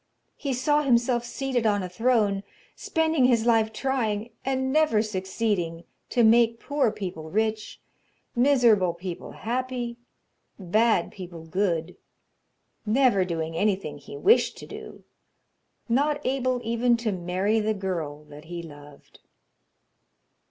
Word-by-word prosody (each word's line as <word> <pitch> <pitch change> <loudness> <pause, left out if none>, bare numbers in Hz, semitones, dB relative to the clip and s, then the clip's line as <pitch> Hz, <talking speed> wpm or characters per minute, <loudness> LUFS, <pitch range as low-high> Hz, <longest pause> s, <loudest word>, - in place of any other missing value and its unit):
He 280 - -4
saw 295 +4 +2
himself 240 -3 +2
seated 250 -2 -1
on 205 -2 +1
a - - -3
throne, 210 0 +1 0.3
spending 320 -4 +1
his 235 -3 +3
life 225 -2 +3
trying, 230 -3 -2
and 265 0 -1
never 305 -9 +3
succeeding, 190 -4 -2 0.3
to 240 - +2
make 230 +1 +5
poor 285 -5 0
people 180 -7 -6
rich; 220 +3 -1 0.6
miserable 235 -9 +4
people 175 0 -7
happy; 245 0 -3 0.6
bad 210 0 +2
people 175 -4 -9
good; 175 -1 -1 0.9
never 225 -3 +3
doing 165 -2 -3
anything 185 -6 -1
he 140 0 -10
wished 450 - +3
to - - -9
do, - - -10 0.8
not 285 +5 +1
able 255 -1 0
even 235 +1 +2
to 230 -2 -1
marry 185 +4 0
the 215 0 0
girl 165 -7 -4
that 150 0 -13
he 170 +1 -6
loved. 145 -2 -14
220 Hz, 125 wpm, -26 LUFS, 180-245 Hz, 0.9 s, make